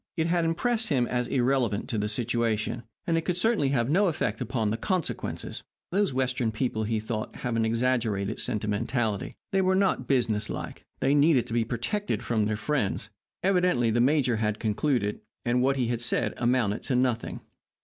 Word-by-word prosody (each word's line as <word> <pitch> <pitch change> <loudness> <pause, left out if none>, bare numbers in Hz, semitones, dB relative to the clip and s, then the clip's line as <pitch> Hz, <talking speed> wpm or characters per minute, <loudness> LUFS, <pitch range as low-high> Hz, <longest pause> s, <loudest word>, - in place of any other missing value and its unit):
It 160 - +2
had 170 0 +1
impressed 225 +7 0
him 130 -5 +2
as 125 0 -1
irrelevant 125 -5 +1
to 110 - -1
the 105 0 -1
situation, 115 0 -1 0.2
and 165 -1 +2
it - - -2
could 180 +1 -1
certainly 215 -7 +2
have 120 -4 +1
no 190 +8 +3
effect 125 - -1
upon 115 -3 -1
the 110 - -1
consequences. 180 - -3 0.3
Those 195 -1 +2
Western 125 -3 0
people, 110 -1 -1
he 110 0 0
thought, 110 0 -4
had 120 -2 -3
an 115 0 +2
exaggerated 115 -3 0
sentimentality. 110 +1 -1 0.2
They 195 - +3
were 185 0 +3
not 190 -10 +1
business 115 -6 +1
like. - - -6
They 135 - +3
needed 145 -3 +4
to - - -7
be 115 -1 +2
protected 130 - -2
from 110 -3 +1
their 110 0 -1
friends. 125 -3 -1 0.3
Evidently 180 -11 +3
the 120 +2 +2
major 130 -3 +3
had 105 -1 0
concluded. 110 -1 0 0.2
And 125 +1 +2
what 135 +2 +3
he 130 -2 +1
had 120 -1 -1
said 120 - +1
amounted 120 -4 +1
to 130 - 0
nothing. 125 -2 0
120 Hz, 180 wpm, -27 LUFS, 110-145 Hz, 0.3 s, needed